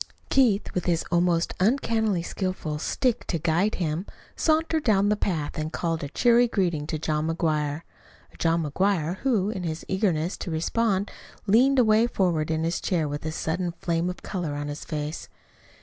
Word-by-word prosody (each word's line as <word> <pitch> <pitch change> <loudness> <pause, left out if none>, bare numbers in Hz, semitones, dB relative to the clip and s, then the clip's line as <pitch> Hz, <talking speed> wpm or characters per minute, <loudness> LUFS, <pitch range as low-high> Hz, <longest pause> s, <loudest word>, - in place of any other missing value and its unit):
Keith, 235 -7 +3
with 180 - -2
his 170 -2 +1
almost 175 -1 +2
uncannily 220 -3 +1
skillful 180 -5 -3
stick 245 - 0
to 170 - 0
guide 170 +6 +1
him, 170 +2 -2 0.3
sauntered 320 0 +1
down 205 -3 +3
the 210 - +3
path 160 -8 -2
and 155 +1 -3
called 165 -2 -2
a 140 - -4
cheery 240 - +4
greeting 175 -9 -1
to 155 - -2
John 155 0 -1
McGuire 155 -2 -1 0.5
a - - -17
John 165 0 +1
McGuire 175 +2 0
who, 215 -6 +1
in 190 - -4
his 160 -2 -4
eagerness 185 -4 0
to - - -5
respond, 195 +5 0 0.3
leaned 250 +7 +4
away 225 -1 +5
forward 170 -8 0
in 160 0 0
his 165 +1 -1
chair 165 -5 0
with 145 0 -5
a - - -2
sudden 170 +2 -2
flame 170 +1 -1
of 180 - -7
color 175 -7 -3
in 145 0 -4
his 145 +1 -6
face. 150 -1 -5
175 Hz, 175 wpm, -26 LUFS, 160-210 Hz, 0.5 s, away